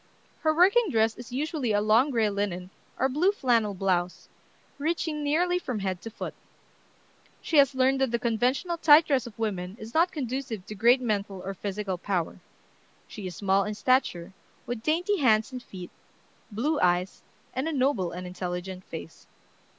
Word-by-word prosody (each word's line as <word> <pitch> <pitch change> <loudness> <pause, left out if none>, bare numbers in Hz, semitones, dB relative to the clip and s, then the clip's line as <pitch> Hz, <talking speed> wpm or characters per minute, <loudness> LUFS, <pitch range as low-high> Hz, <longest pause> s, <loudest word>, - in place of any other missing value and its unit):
Her 315 - +2
working 380 +7 +4
dress 220 -3 +2
is 245 -1 -11
usually 275 -3 -1
a 205 - +3
long 220 +6 +4
gray 230 -5 +2
linen 195 -3 -3 0.3
or 265 - +2
blue 305 +9 +2
flannel 230 - +1
blouse, 180 -2 -1 0.5
reaching 315 0 -1
nearly 350 +5 +1
from 250 -9 -4
head 190 -3 -3
to 225 - -7
foot. 225 - -6 1.1
She 320 - -1
has 275 -2 +5
learned 265 +1 +2
that 265 - +2
the 235 - 0
conventional 250 +9 0
tight 310 0 +7
dress 265 -4 +1
of 215 - -12
women 195 -3 -3
is 220 +1 -9
not 335 +3 +3
conducive 255 - -4
to - - -7
great 235 +5 +4
mental 200 -5 -2
or 195 - -3
physical 195 -1 -4
power. 185 -2 -2 0.7
She 205 -3 -7
is 180 - -7
small 195 +1 +2
in 210 +1 -4
stature, 205 -7 +1 0.3
with 240 -2 -4
dainty 350 - +1
hands 220 -3 +3
and 255 -1 -6
feet, 180 -6 -10 0.6
blue 290 +9 0
eyes, 180 +1 +1 0.3
and 260 +4 -2
a - - -1
noble 260 - +1
and 180 +1 -6
intelligent 180 +1 -5
face. 85 - -9
230 Hz, 170 wpm, -27 LUFS, 195-280 Hz, 1.1 s, tight